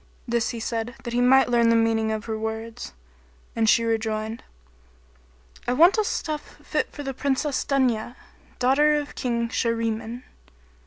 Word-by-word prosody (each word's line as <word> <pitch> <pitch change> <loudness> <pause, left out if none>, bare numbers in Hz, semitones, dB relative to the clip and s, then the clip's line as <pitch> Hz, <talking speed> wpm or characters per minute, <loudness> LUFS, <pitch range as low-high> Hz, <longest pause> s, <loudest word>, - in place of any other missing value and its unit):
This 235 -1 0
he 235 - -5
said, 230 +2 -3
that 240 -2 -5
he 245 - +2
might 265 +1 +5
learn 235 -1 +3
the 230 - +4
meaning 225 -1 +2
of 220 0 -3
her 220 - -3
words; 220 - -5 0.6
and 225 -1 +2
she 230 - +4
rejoined, 220 0 -2 1.2
"I 245 - +2
want 340 - +5
a - - +3
stuff 310 -8 -4
fit - - -1
for 290 - -7
the 270 -1 -4
Princess 280 +1 -1
Dunya, 250 -4 0 0.4
daughter 290 +4 +4
of 295 -1 -3
King 235 -2 -1
Shahriman." 230 0 -2
235 Hz, 155 wpm, -24 LUFS, 225-265 Hz, 1.2 s, might